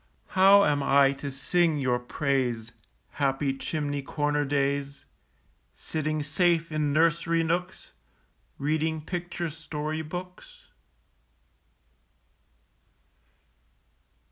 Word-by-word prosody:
How 195 +2 +6
am 145 -1 +1
I 140 0 +4
to 140 - -4
sing 155 +4 +1
your 125 -3 0
praise, 125 -3 -1 0.4
Happy 135 -1 0
chimney 145 0 -3
corner 145 +1 -1
days, 140 0 -1 0.7
Sitting 155 -1 -2
safe 165 +2 +1
in 150 -1 0
nursery 165 +2 +2
nooks, 175 +3 -3 0.7
Reading 155 +2 -1
picture 175 0 -4
story 155 0 -4
books? 180 - -9
150 Hz, 85 wpm, -27 LUFS, 140-165 Hz, 0.7 s, How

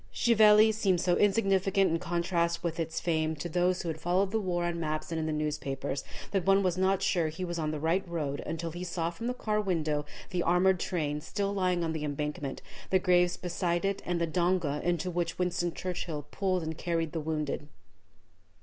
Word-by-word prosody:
Chieveley 215 -1 +6
seemed 195 -5 +2
so 175 0 +2
insignificant 195 -2 +3
in 165 - +1
contrast 170 -1 0
with 170 -1 -2
its 165 0 -2
fame 160 -2 0
to 150 +3 -5
those 180 +2 +1
who - - -5
had 160 -1 -3
followed 185 +3 +1
the 220 - +1
war 175 -4 -1
on 170 -1 -2
maps 155 0 -3
and 165 - -1
in 160 - -1
the - - 0
newspapers, 145 -3 -2 0.3
that 195 -3 +1
one 195 +1 +4
was 180 -2 +1
not 190 +1 +2
sure 170 -4 +2
he 160 +4 -4
was 175 -1 -3
on 155 -1 -1
the 155 -1 -3
right 165 +5 +1
road 150 -4 -2
until 165 +1 -3
he 175 +2 -6
saw 170 -2 -2
from 230 +7 -6
the 250 - 0
car 215 -3 0
window 155 -6 0 0.3
the 180 -2 0
armored 180 +2 +3
train 150 -5 -2
still 200 +5 -2
lying 180 -3 +1
on 160 -1 -1
the 155 -1 -3
embankment, 150 -1 -3 0.3
the 190 - +4
graves 180 -1 +3
beside 175 0 -1
it, 195 0 -1
and 175 -1 -1
the 170 - +2
donga 170 -3 0
into 175 +1 0
which 170 -1 -2
Winston 175 -1 0
Churchill 165 -4 -4
pulled 185 -3 0
and 160 0 -3
carried 165 -2 -1
the 165 - -3
wounded. 150 -2 -2
175 Hz, 205 wpm, -30 LUFS, 160-185 Hz, 0.3 s, Chieveley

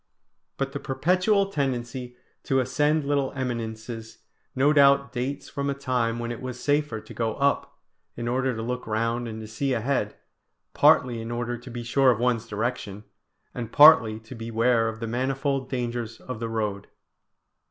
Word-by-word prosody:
But 135 0 -2
the 145 - -4
perpetual 185 +9 +1
tendency 125 -4 -3 0.3
to 135 - +2
ascend 145 +4 +1
little 140 -2 0
eminences 115 -3 -5 0.4
no 140 +3 +4
doubt 140 -1 +5
dates 135 +3 -3
from 140 -1 -3
a 140 - -1
time 125 -4 -1
when 120 0 -3
it 120 - -6
was 130 -1 -6
safer 145 -4 0
to - - -12
go 115 -2 -1
up, 140 0 0 0.4
in 120 0 -3
order 130 +1 0
to 110 - -4
look 125 +1 -4
round 115 +2 -1
and 110 -1 -6
to 110 - -8
see 130 +5 -1
ahead, 115 -3 -1 0.6
partly 120 -3 +4
in 115 - -6
order 120 0 -2
to 120 +2 -11
be 120 0 -6
sure 130 +3 +3
of 120 - +3
one's 120 -2 0
direction, 105 -2 -3 0.5
and 115 -2 -5
partly 145 -8 +7
to 115 +3 -11
beware 115 0 +1
of 110 0 -8
the 115 - -2
manifold 135 +2 -1
dangers 120 -3 -3
of 130 -4 -7
the 115 -1 -3
road. 105 -3 -2
125 Hz, 170 wpm, -26 LUFS, 115-135 Hz, 0.6 s, partly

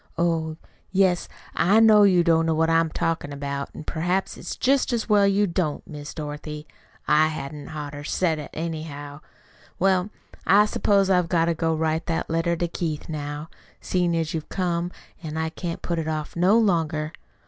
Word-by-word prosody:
Oh, 165 -2 0 0.3
yes, 185 -2 +2 0.3
I 195 +7 +4
know 220 -2 +7
you 185 -4 +5
don't 165 -1 +3
know 160 - +2
what 160 +1 +2
I'm 165 0 +3
talkin' 160 -2 -2
about, 140 0 -4
an' - - -7
perhaps 175 +5 -1
it's - - -6
jest 270 +1 +2
as 235 -2 -1
well 205 -2 +5
you 200 +1 +3
don't, 170 -5 -2
Miss 145 -1 -8
Dorothy. 150 0 -6 0.4
I 155 +1 +5
hadn't 150 -1 -6
oughter 145 -1 -6
said 160 +1 0
it, 150 - -7
anyhow. 155 -3 -5 0.6
Well, 190 +1 +2 0.3
I 205 +1 +5
s'pose 200 -2 +2
I've 180 -2 +3
got 165 -2 +3
to 170 - +1
go 165 0 0
write 160 +1 -1
that 165 -1 -2
letter 165 +1 +1
to 175 +1 -1
Keith 165 -3 -4
now. 145 0 -5 0.3
Seein' 175 -2 0
as 160 -1 -1
how - - -1
you've 155 - -8
come 175 -2 -1 0.3
I 160 0 -2
can't 170 0 -5
put 170 -1 -1
it 160 - -3
off 155 -1 -3
no 185 +6 +4
longer. 165 -7 +1
165 Hz, 180 wpm, -24 LUFS, 155-180 Hz, 0.6 s, know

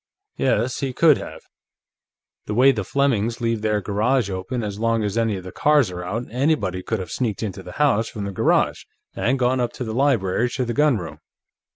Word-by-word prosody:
Yes, 125 -1 0
he 135 -2 -2
could 155 +1 +5
have. - - -8 1.1
The 105 - -2
way 130 +4 +6
the 110 -6 -3
Flemings 120 -2 0
leave 115 -2 -1
their 105 -1 0
garage 110 +3 0
open 95 +6 -3
as 105 -1 -5
long 115 -1 +1
as 105 -1 -2
any 115 -2 +1
of 90 - -8
the 90 - -8
cars 145 -6 +3
are 90 0 -6
out, 105 +7 -3
anybody 120 - 0
could 110 - -2
have 90 -4 -6
sneaked 115 -4 -2
into 100 -2 -4
the - - -10
house 125 -7 +2
from 105 - -6
the 100 - -4
garage, 95 - +1 0.3
and 130 +4 +1
gone 130 0 +1
up 120 -1 -2
from 125 - -4
the 110 - -4
library 120 -4 +1
to 130 - -1
the 120 - -2
gunroom. 125 - +1
115 Hz, 205 wpm, -22 LUFS, 100-130 Hz, 1.1 s, way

